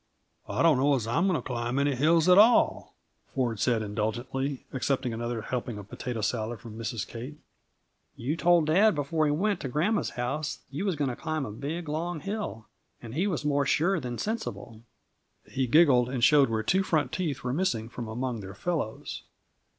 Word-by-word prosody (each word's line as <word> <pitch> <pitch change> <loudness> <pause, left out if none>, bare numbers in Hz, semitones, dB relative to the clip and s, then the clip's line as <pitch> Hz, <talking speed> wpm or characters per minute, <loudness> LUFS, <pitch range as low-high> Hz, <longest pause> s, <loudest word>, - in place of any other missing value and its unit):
"I - - 0
don't 160 -6 +5
know 140 +1 +4
as 120 -5 -2
I'm 145 +12 +1
going 185 - +2
to - - -9
climb 120 0 -2
any 140 0 +2
hills 160 +5 +3
at 180 +2 +7
all," 225 +3 +4 0.4
Ford 120 -5 0
said 115 -2 +1
indulgently, 120 +6 -3
accepting 130 -1 -1
another 120 0 -3
helping 120 -2 -3
of 100 0 -10
potato 120 -3 -4
salad 110 +1 -2
from 110 -1 -10
Mrs. 115 -2 -3
Kate. 125 +6 -8 0.8
"You 135 +7 -2
told 170 -1 +4
dad 190 +6 +4
before 150 +2 0
he - - +2
went 200 +7 0
to 135 - -4
gran'ma's 170 - +1
house 140 +5 -2
you 145 +8 -3
was 190 -4 0
going 140 -3 -1
to - - -5
climb 155 0 -3
a 105 - -6
big, 155 +9 -5
long 160 +2 -2
hill, 195 - -5 0.3
and 115 -1 -9
he 175 +8 +1
was 165 -6 -2
more 145 -1 +1
sure 175 +5 +2
than 125 -3 -5
sensible." 215 - -4 0.6
He 130 -1 -2
giggled 125 -4 +5
and 125 -2 -2
showed 140 -1 +6
where 110 -1 -1
two 190 - +2
front 160 -5 0
teeth 155 -8 -2
were 125 0 -1
missing 130 -10 0
from 120 0 -7
among 120 +1 -3
their 95 -1 -8
fellows. 150 -4 -3
135 Hz, 190 wpm, -28 LUFS, 120-160 Hz, 0.8 s, at